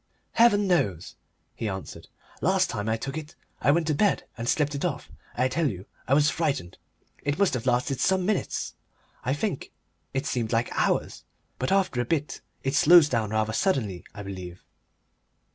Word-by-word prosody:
"Heaven 225 -3 +5
knows!" 115 - 0 0.4
he 110 - -3
answered. 95 -1 -7 0.3
"Last 185 +2 +2
time 105 -2 -3
I 110 - +1
took 135 +6 -4
it 155 0 -11 0.3
I - - +2
went 160 +3 +3
to 155 - +1
bed 200 +7 +2
and 115 0 -3
slept 150 -1 +1
it 140 - -3
off. 175 -6 -3 0.2
I 125 +1 +2
tell 155 +2 +1
you, 95 -3 -7 0.2
I 135 - +4
was 150 0 +4
frightened. 145 - -1 0.4
It 145 +1 -1
must 200 -2 +3
have 125 0 -2
lasted 125 +2 +1
some 190 -1 +2
minutes, 210 0 -1 0.5
I 130 +3 0
think 170 -2 -3 0.4
it 135 +1 -2
seemed 120 -7 -1
like 115 0 +1
hours. - - 0 0.4
But 130 - -1
after 195 -10 +2
a - - -2
bit 150 +1 -2 0.2
it 135 - 0
slows 165 0 +7
down 115 -5 0
rather 110 0 0
suddenly, 115 - 0
I 100 - -8
believe." 95 -2 -8
135 Hz, 180 wpm, -26 LUFS, 110-165 Hz, 0.5 s, slows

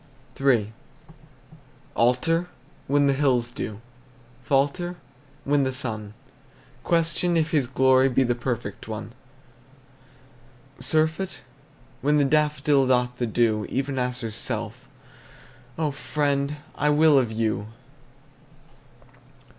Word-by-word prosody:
III. 115 -6 +2 1.2
Alter? 165 +9 +2 0.4
When 145 +1 +3
the 140 - +3
hills 130 -4 +1
do. 105 -2 -6 0.6
Falter? 145 +7 0 0.5
When 145 0 +3
the 130 -1 0
sun 110 -5 -4 0.7
Question 170 +1 +1
if 160 0 +1
his 145 -6 +2
glory 130 +1 +4
Be 130 +1 +2
the 120 -1 +1
perfect 120 -5 -4
one. 110 +1 -6 1.7
Surfeit? 160 +4 0 0.6
When 150 +2 +3
the 145 - +3
daffodil 150 -2 +2
Doth 125 -1 +2
of 125 - -27
the 120 - 0
dew: 110 -2 +1
Even 135 0 -2
as 125 0 -2
herself, 110 -2 -5 0.9
O 155 -2 0
friend! 140 0 -1 0.2
I 150 - 0
will 150 -1 +5
of 120 -4 -1
you! 110 -2 -1
135 Hz, 105 wpm, -25 LUFS, 120-150 Hz, 1.7 s, will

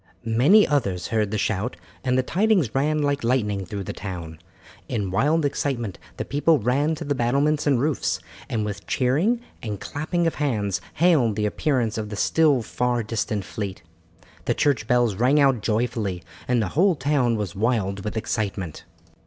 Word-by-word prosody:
Many 135 - +5
others 100 - 0
heard 110 -3 +1
the 105 - -2
shout, 105 +1 -1 0.3
and 130 -1 +1
the 130 - +2
tidings 185 - +2
ran 150 +2 +1
like 140 -1 0
lightning 105 -6 0
through 100 +1 -4
the - - -5
town. 85 -5 -7 0.5
In 105 -6 -2
wild 150 - +2
excitement 120 -8 -2 0.2
the - - -3
people 150 +3 +3
ran 140 +7 +1
to 155 - -6
the 145 -2 0
battlements 140 +5 +1
and 135 -4 +3
roofs, 145 +1 0 0.3
and 110 -2 -1
with 105 -1 -6
cheering 160 - +1 0.2
and 105 -3 -4
clapping 170 +4 -2
of 165 - +1
hands 105 -9 0
hailed 150 - +3
the 105 0 0
appearance 115 -1 0
of 105 -1 -4
the 105 - -5
still 145 +2 +3
far 120 +1 -1
distant 105 -2 -2
fleet. 95 -3 -5 0.6
The - - +1
church 125 -7 +1
bells 120 -3 +3
rang 130 +6 +3
out 135 -5 +3
joyfully 110 -5 -1 0.2
and 125 -2 +2
the 95 - -2
whole 185 +3 +3
town 135 -4 +1
was 105 -5 -4
wild 100 -3 0
with 105 +1 -4
excitement. 100 -6 -3
120 Hz, 170 wpm, -24 LUFS, 105-145 Hz, 0.6 s, Many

